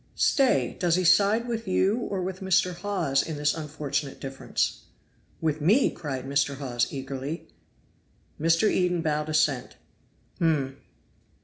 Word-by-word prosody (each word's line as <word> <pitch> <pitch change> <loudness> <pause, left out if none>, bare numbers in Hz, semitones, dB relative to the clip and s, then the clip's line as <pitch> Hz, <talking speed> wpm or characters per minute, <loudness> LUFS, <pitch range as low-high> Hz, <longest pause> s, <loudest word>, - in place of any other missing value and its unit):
"Stay! 250 - +2
does 175 -2 +2
he 185 - +1
side 205 +6 +4
with 230 -3 -3
you 190 +2 +2
or 195 -5 -3
with 185 0 -4
Mr. 190 -1 +2
Hawes 175 -7 0
in 160 -2 -5
this 145 0 +2
unfortunate 150 -3 -4
difference?" 135 0 -3 0.5
"With 155 -1 -1
me!" 210 - +4
cried 135 -5 -5
Mr. 140 0 0
Hawes 125 -4 -1
eagerly. 135 +3 -5 0.9
Mr. 165 +6 +3
Eden 180 -4 +1
bowed 150 -1 -1
assent. 145 -4 +1 0.6
"Hum!" 140 -5 +1
160 Hz, 130 wpm, -26 LUFS, 140-185 Hz, 0.9 s, side